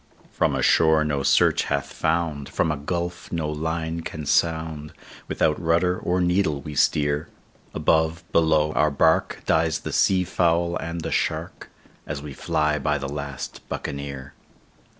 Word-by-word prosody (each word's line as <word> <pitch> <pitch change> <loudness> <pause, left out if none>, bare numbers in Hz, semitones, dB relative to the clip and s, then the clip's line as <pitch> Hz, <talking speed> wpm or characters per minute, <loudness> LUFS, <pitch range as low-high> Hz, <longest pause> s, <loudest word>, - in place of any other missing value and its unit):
"From - - +1
a - - -1
shore 80 -1 +4
no 70 -2 -1
search - - +3
hath 70 0 -2
found, 80 -4 -1
from 80 - 0
a - - -1
gulf 85 +4 -4
no 80 -3 -1
line 80 +2 -3
can 80 -2 -6
sound, 80 -1 0 0.3
Without 75 +2 0
rudder 85 +2 +2
or 90 +1 0
needle 90 -4 +1
we 75 +2 -8
steer; 75 +1 +1 0.5
Above, 80 +1 +1
below, 80 -2 +3
our 75 - +3
bark, 70 - +1
dies 80 -1 +1
the - - -5
sea 95 -1 +3
fowl 85 -1 +1
and 85 +1 -5
the - - -4
shark, - - -2 0.4
As 75 -1 -4
we 70 -1 -8
fly 75 +2 0
by 75 +2 0
the 70 0 -4
last 70 -2 -6
Buccaneer. 70 -1 -5
80 Hz, 150 wpm, -24 LUFS, 75-85 Hz, 0.5 s, shore